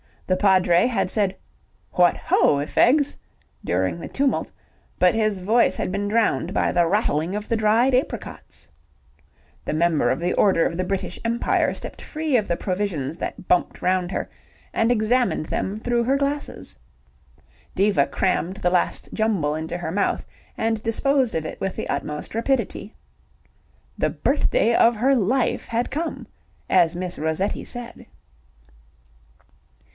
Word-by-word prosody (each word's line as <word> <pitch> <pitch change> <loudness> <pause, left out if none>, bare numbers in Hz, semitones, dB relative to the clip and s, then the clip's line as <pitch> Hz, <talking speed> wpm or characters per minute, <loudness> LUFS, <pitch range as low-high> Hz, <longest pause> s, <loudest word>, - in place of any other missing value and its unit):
The 185 - +1
Padre 185 -1 +4
had 230 -7 0
said 200 -3 0 0.6
"What 175 -1 +4
ho, 145 - +2
i' 140 - -1
fegs?" 285 - +3 0.5
during 95 - 0
the - - -6
tumult, 275 -1 -1 0.5
but 180 0 +4
his 215 -3 0
voice 220 +6 +3
had - - -3
been 200 +1 -2
drowned 205 - +1
by - - +1
the 175 -1 +2
rattling 185 -3 0
of 210 0 -5
the 230 - +1
dried 225 +5 +3
apricots. 250 - -3 1.0
The - - -2
Member 165 0 +2
of - - 0
the 175 +1 0
Order 190 -5 +3
of - - -1
the 185 - -1
British 190 -1 -3
Empire 235 +1 +1
stepped - - -7
free 310 -3 -2
of 215 - -1
the 170 - 0
provisions 180 -7 -2
that 180 - -6
bumped 180 - +1
round 180 -1 +1
her, - - -3 0.5
and 225 - +2
examined 235 -5 +1
them 200 +2 -2
through 235 +1 0
her 265 +3 +2
glasses. 285 +1 -3 1.0
Diva 195 -8 +3
crammed 185 0 -1
the 180 -3 0
last 180 -1 0
jumble 200 -10 0
into 160 +2 -4
her 170 -2 -4
mouth 200 +3 0 0.3
and 225 -1 0
disposed 260 +2 +1
of 160 -1 -2
it - - -6
with 195 -1 -3
the - - -5
utmost 150 0 -4
rapidity. 230 -2 -2 1.0
The - - +1
birthday 235 - +1
of 230 0 +4
her 255 +6 +2
life 245 +2 +1
had 235 +1 -2
come, 320 +4 -3 0.4
as 175 -2 +4
Miss 180 0 -4
Rossetti 160 +6 -1
said. 240 -1 -8
200 Hz, 150 wpm, -23 LUFS, 175-235 Hz, 1.0 s, Padre